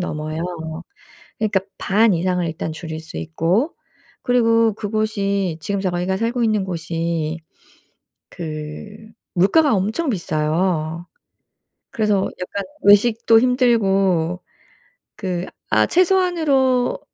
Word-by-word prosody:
넘어요. 155 -2 -4 1.0
그러니까 210 -3 +1 0.2
반 215 +1 +3
이상을 180 +1 0
일단 160 0 -4
줄일 160 0 -6
수 160 +1 -10
있고 170 - 0 0.5
그리고 230 -3 +3
그곳이 200 -4 -1
지금 200 +5 -2
저희가 185 0 -1
살고 235 +2 -1
있는 215 -3 +1
곳이 165 -2 -3 0.9
그 155 +5 -7 0.4
물가가 245 - +4
엄청 215 - -1
비싸요. 165 -2 -1 0.8
그래서 210 -2 +1 0.2
약간 200 +2 -4 0.2
외식도 225 +2 +5
힘들고 195 -9 +2 0.7
그 180 -3 -3 0.3
아 - - +5
최소한으로 330 -9 +2
195 Hz, 215 characters per minute, -20 LUFS, 170-230 Hz, 1.0 s, 외식도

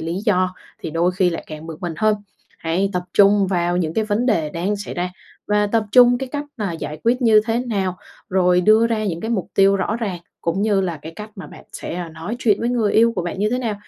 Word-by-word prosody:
lý 165 +1 -3
do 185 -3 +2 0.2
thì - - -6
đôi 170 +3 +1
khi 180 -1 +2
lại 165 - -5
càng 155 0 -8
bực 160 -2 -8
mình 175 -2 -4
hơn. 215 +3 +3 0.4
Hãy 180 +4 0
tập 180 - -1
trung 200 0 +5
vào 175 -2 0
những 165 -3 -1
cái 220 - +1
vấn 215 +3 0
đề 165 -11 +1
đang 180 +6 -2
xảy 205 - -6
ra 180 +1 -2 0.4
và 210 0 +2
tập 220 +1 +1
trung 245 -1 +7
cái 265 - -4
cách 290 0 -3
mà 205 -5 -2
giải 155 -1 -6
quyết 245 +3 +2
như 220 -3 +6
thế 225 0 +1
nào, 200 -7 -2 0.3
rồi 180 -1 +3
đưa 215 +5 +5
ra 220 -2 -1
những 170 -5 -2
cái 225 - -4
mục 195 -7 -1
tiêu 195 0 +5
rõ 200 +3 -1
ràng, 200 -7 -3 0.2
cũng 175 +4 -1
như 205 -3 +2
là 175 -3 -2
cái 160 +1 -8
cách 215 +1 -8
mà 190 - -8
bạn - - -13
sẽ, - - -6
à, 175 -1 -4
nói 165 +8 -6
chuyện 215 -5 +2
với 235 - 0
người 230 -4 +1
yêu 230 +1 +4
của 180 - 0
bạn 175 +1 -4
như 210 +2 +1
thế 250 - 0
nào. 230 -4 -2
195 Hz, 260 wpm, -21 LUFS, 175-220 Hz, 0.4 s, trung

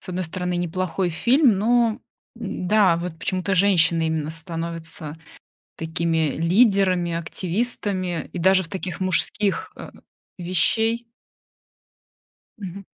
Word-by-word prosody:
с - - -16
одной 185 0 -2
стороны 180 +2 -3
неплохой 175 +1 -1
фильм, 240 - +3
но, 235 +2 +2 0.4
н-да, 195 -3 +2
вот 170 -1 -5
почему-то 185 +3 -1
женщины 170 -4 +3
именно 160 -1 -2
становятся 165 -1 -6 0.6
такими 160 -1 0
лидерами, 185 -1 +3
активистами 185 +1 -2
и 180 - -5
даже 190 +2 +4
в - - -5
таких 185 -3 -5
мужских, 185 +2 0
э, - - -10 0.5
вещей. 220 +6 +1 1.5
Мгм. 195 -1 -7
180 Hz, 105 wpm, -23 LUFS, 165-200 Hz, 1.5 s, даже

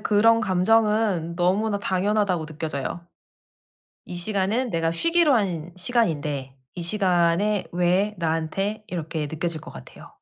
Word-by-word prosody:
그런 225 +2 +4
감정은 205 -3 +2
너무나 200 +4 +1
당연하다고 190 -3 0
느껴져요. 155 +1 -5 1.0
'이 180 - -7
시간은 210 +6 -1
내가 165 -2 0
쉬기로 330 - +3
한 175 -7 -1
시간인데 150 - -1 0.2
이 175 - -5
시간에 185 +2 +1
왜 180 +4 +1
나한테?' 175 +6 -2
이렇게 160 -3 -4
느껴질 160 0 -3
것 155 - -11
같아요. - - -12
180 Hz, 290 characters per minute, -24 LUFS, 165-210 Hz, 1.0 s, 그런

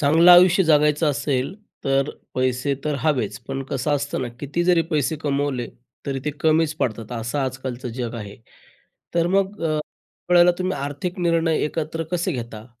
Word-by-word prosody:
चांगलं 160 +5 +6
आयुष्य 180 +1 +7
जगायचं 150 0 +3
असेल 135 +2 -1 0.3
तर 135 +1 +1 0.2
पैसे 130 +2 0
तर 150 -1 0
हवेच 145 -2 0
पण 135 0 -3
कसं 140 +2 0
असतं 145 -1 -3
ना 125 - -3
किती 155 +5 -2
जरी 175 -2 +4
पैसे 155 0 0
कमवले 140 -4 -1 0.4
तरी 135 -1 -2
ते 150 - 0
कमीच 160 0 +3
पडतात, 115 -4 -3
असं 120 +4 -3
आज-कालचं 130 -1 -3
जग 120 0 -4
आहे. 105 -3 -7 0.8
तर 170 0 +2
मग 195 +1 0
अ, 155 -1 +1 0.5
वेळेला 175 0 +7
तुम्ही 185 0 -1
आर्थिक 145 +7 -4
निर्णय 165 -2 +2
एकत्र 160 +1 -3
कसे 180 +1 0
घेता? 115 -4 -6
145 Hz, 160 wpm, -22 LUFS, 130-165 Hz, 0.8 s, आयुष्य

